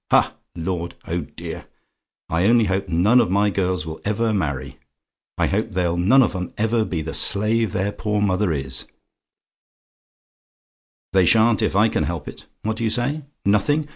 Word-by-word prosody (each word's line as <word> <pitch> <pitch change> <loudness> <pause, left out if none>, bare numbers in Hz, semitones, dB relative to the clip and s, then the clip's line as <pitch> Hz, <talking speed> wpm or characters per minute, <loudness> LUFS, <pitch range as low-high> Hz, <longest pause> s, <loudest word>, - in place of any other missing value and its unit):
Ha, - - +3 0.2
lord! 85 0 -3
Oh, 85 +1 -2
dear! 70 - -8 0.6
I 85 +4 +1
only 115 -1 +5
hope 95 0 -1
none 100 +9 +4
of 115 - 0
my 100 +2 +2
girls 90 -4 -1
will 80 0 -7
ever 110 +2 0
marry 75 -10 -3 0.6
I - - +2
hope 110 +2 -1
they'll 90 -2 0
none 110 +10 +5
of 110 - -1
'em 90 -1 -5
ever 110 +1 +1
be 80 -6 -3
the 80 - -5
slave 110 +1 +1
their 100 +2 -1
poor 105 0 -2
mother 100 -2 +1
is: 65 -3 -3 2.3
they 95 -2 +5
shan't, 115 -1 +4
if - - 0
I 105 +3 +5
can - - 0
help 85 -4 -4
it. - - -10 0.2
What 110 0 -2
do 115 - -3
you 110 - +2
say? 135 +6 -1 0.2
"NOTHING? 145 +10 +2
100 Hz, 170 wpm, -22 LUFS, 85-110 Hz, 2.3 s, only